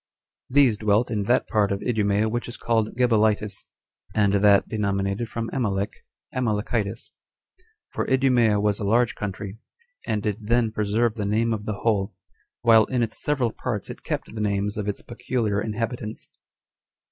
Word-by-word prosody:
These 125 -5 +4
dwelt 105 +3 +2
in 105 -3 -1
that 120 +4 +2
part 105 -3 +1
of 100 - -2
Idumea 105 -2 +1
which 120 +2 -2
is 120 - -6
called 110 -2 0
Gebalitis, 110 -4 +1 0.5
and 100 -2 +3
that 100 0 +5
denominated 100 +1 -1
from 115 -1 -4
Amalek, 105 -5 -1 0.4
Amalekitis; 110 -2 -1 0.8
for - - -2
Idumea 125 -5 +3
was 105 -1 +1
a - - -3
large 115 +3 +2
country, 105 +1 -6 0.5
and 105 -1 -1
did 105 0 -3
then 115 -1 +2
preserve 110 +2 +1
the 105 -3 -3
name 115 +3 +1
of 105 -1 -4
the 105 -1 -3
whole, 100 -4 0 0.5
while 115 -2 +6
in 125 -2 0
its 115 -1 -4
several 135 -6 +1
parts 110 -3 -4
it - - -10
kept - - -4
the 110 - -4
names 100 0 0
of 105 -1 -3
its 100 - -3
peculiar 115 -3 -2
inhabitants. 110 +1 -4
110 Hz, 160 wpm, -24 LUFS, 105-115 Hz, 0.8 s, while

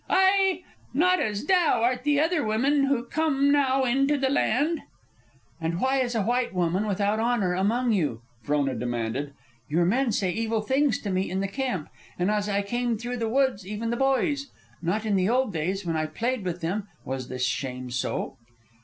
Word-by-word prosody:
Ai! 380 -1 +3 0.3
Not 365 +5 +4
as 210 +3 -2
thou 335 -10 +3
art 250 +1 +1
the 295 -1 +2
other 320 0 +2
women 270 +6 +2
who 270 -3 0
come 280 0 +1
now 270 -2 +3
into 275 +3 +2
the 265 -1 +1
land!" 290 +5 +1 0.8
"And 165 +1 -2
why 265 +3 +2
is 245 -2 -1
a 220 - +1
white 240 -1 0
woman 180 +4 +1
without 205 +2 0
honor 225 -6 +1
among 230 +7 +1
you?" 150 - 0 0.2
Frona 145 0 0
demanded. 120 +4 -3 0.3
"Your 170 +4 +2
men 240 +6 +2
say 190 -3 0
evil 225 +1 -1
things 265 +2 +2
to 205 - -3
me 185 +1 0
in 190 +2 -2
the 195 - 0
camp, 245 - -3 0.3
and 180 +3 +1
as 210 0 0
I 200 0 +1
came 240 +2 -1
through 245 +3 -4
the 225 -2 -1
woods, 255 -6 +1
even 215 +3 -3
the - - 0
boys. 270 +2 +1 0.3
Not 200 +6 -1
in 210 -2 +1
the 185 +1 +2
old 250 -3 +1
days, 180 +5 -2
when 165 -1 -1
I 155 0 0
played 235 +8 -2
with 180 0 -3
them, 195 +5 -2 0.2
was 130 -1 -4
this 130 0 -1
shame 125 0 -3
so." 125 - -2
220 Hz, 190 wpm, -26 LUFS, 180-270 Hz, 0.8 s, Not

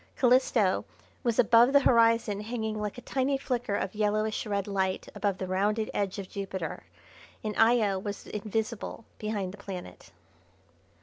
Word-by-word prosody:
Calisto 245 -6 +3 0.4
was 235 -4 0
above 235 +2 +6
the 280 - +7
horizon 230 -4 +3
hanging 220 -1 -3
like 210 +1 -4
a - - -7
tiny 270 +2 0
flicker 245 -5 -2
of 190 - -2
yellowish 215 +1 0
red 200 -2 -1
light 190 -2 -1
above 200 -3 -1
the 185 - -3
rounded 205 +4 0
edge 200 -1 -1
of 195 -2 -5
Jupiter, 190 -4 -5 0.6
and 215 -1 -3
Io 225 -4 +4
was 200 +1 -6
invisible 215 +2 -4
behind 205 -3 -3
the 205 - -12
planet. 195 - -8
215 Hz, 145 wpm, -29 LUFS, 200-230 Hz, 0.6 s, the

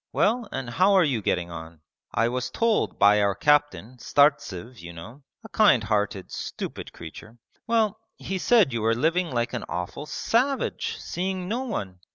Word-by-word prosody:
Well, 230 +1 +1
and 135 - -4
how 185 +11 +3
are 190 -2 +6
you 130 -8 0
getting 85 -3 -1
on? 80 -1 -9 0.3
I 115 - +1
was 125 0 -2
told 230 -2 0
by 105 +1 +5
our 100 -1 +1
captain, 145 -2 +1
Startsev 125 - +1
you 85 0 -9
know, 110 - -11 0.2
a 220 - -11
kind 200 - +4
hearted 105 -2 -1
stupid - - -6
creature.... 110 +2 -11 0.3
Well, 220 -2 +1 0.2
he 190 -1 -4
said 215 - +4
you 115 - -1
were 115 +1 +2
living 165 +7 +1
like 120 -1 -2
an 125 - -3
awful 90 - -5
savage, 260 - -1
seeing 185 0 -4
no 240 +6 -2
one! 95 - -5
130 Hz, 170 wpm, -25 LUFS, -, 0.3 s, are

